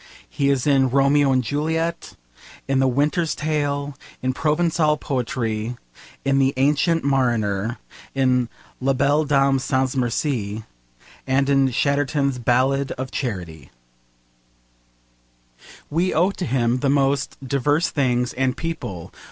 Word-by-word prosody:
He 140 -1 0
is 135 -3 +1
in 135 -3 +3
Romeo 140 +1 +3
and 130 -1 +2
Juliet, 160 +6 -2 0.5
in 135 -1 +1
the 135 - +3
Winter's 150 +6 +1
Tale, 145 -2 -2 0.3
in 130 0 0
Provencal 155 +1 +1
poetry, 120 -4 -3 0.5
in 135 0 +2
the 135 0 +2
Ancient 150 +4 +2
Mariner, 115 -5 0 0.4
in 125 -3 +2 0.3
La 135 +1 +1
Belle 145 +4 +2
Dame 135 -2 +3
sans 130 0 0
merci, 120 -4 -1 0.6
and 135 +1 +2
in 135 -1 +3
Chatterton's 140 0 0
Ballad 130 +3 +1
of 130 0 -6
Charity. 90 - -5 2.2
We 175 +5 0
owe 180 +5 +3
to 190 - -5
him 120 -1 +1
the 140 - 0
most 140 +1 +1
diverse 145 +5 +1
things 125 -4 0
and 130 0 -1
people. 120 - -5
135 Hz, 120 wpm, -22 LUFS, 125-145 Hz, 2.2 s, in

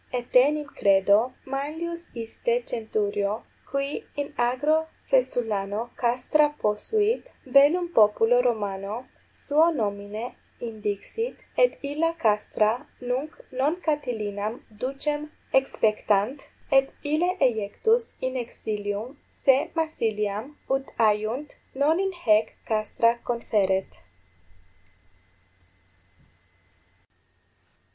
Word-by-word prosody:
14 245 -1 -2
Etenim, 285 +5 +3
credo, 195 0 +5 0.3
Manlius 320 +5 -4
iste 230 - -2
centurio, 205 -2 -1 0.4
qui 275 +1 -2
in 285 0 -4
agro 290 +7 +2 0.2
Faesulano 230 -4 0
castra 255 +5 +2
posuit, 420 - +1 0.2
bellum 285 +7 +5
populo 225 +3 +5
Romano 215 -1 -2 0.2
suo 310 +3 +3
nomine 210 -3 -3 0.3
indixit, 220 - -4 0.2
et - - +3
illa 310 +4 0
castra 220 0 +1
nunc 255 +5 -3
non 270 +5 +1
Catilinam 225 - -2 0.2
ducem 295 +5 -2 0.2
exspectant, 220 -1 +1 0.2
et 270 0 +4
ille 310 +5 +2
eiectus 265 - +1
in 260 0 -2
exilium 215 0 -4
se 275 +4 +2
Massiliam, 225 -5 -1
ut 270 0 0
aiunt, 220 +6 +1 0.2
non 300 +5 +3
in 385 0 +1
haec 215 -1 +4
castra 230 +2 +1
conferet. 200 -5 +1
250 Hz, 85 wpm, -26 LUFS, 215-295 Hz, 0.4 s, credo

